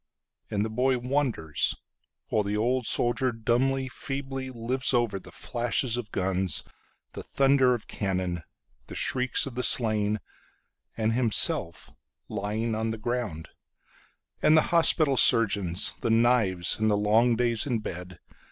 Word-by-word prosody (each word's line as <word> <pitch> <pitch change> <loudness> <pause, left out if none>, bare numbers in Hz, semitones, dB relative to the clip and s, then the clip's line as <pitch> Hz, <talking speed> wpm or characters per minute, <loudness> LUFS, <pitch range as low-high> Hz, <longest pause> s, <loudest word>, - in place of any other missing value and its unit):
And 105 0 -1
the - - -3
boy 130 +3 +1
wonders, 125 - -1 0.5
while 110 - +1
the 105 +1 -2
old 125 +3 0
soldierDumbly, 125 +2 0
feebly 135 -1 -5
lives 130 +2 -1
overThe 115 -6 -1
flashes 120 0 -1
of 120 -3 -5
guns, 95 -3 -1 0.5
the - - -6
thunder 135 -2 +3
of 115 - -9
cannon, 90 -3 -2 0.5
The - - -9
shrieks 125 -1 0
of 135 - -7
the 125 - -2
slain, 110 -4 +1 0.8
And 110 0 0
himself 115 -8 +1 0.4
lying 110 +2 -2
on 110 +1 -1
the 110 - -3
ground, 110 -8 -4 0.9
And 155 - +5
the 155 - +1
hospital 155 -4 +3
surgeons, 100 -8 +3
the - - -1
knives, 115 -7 +2
And 110 0 +2
the 105 - +2
long 110 +4 +3
days 120 0 0
in 125 -4 0
bed. 90 -4 -7
115 Hz, 135 wpm, -27 LUFS, 105-125 Hz, 0.9 s, And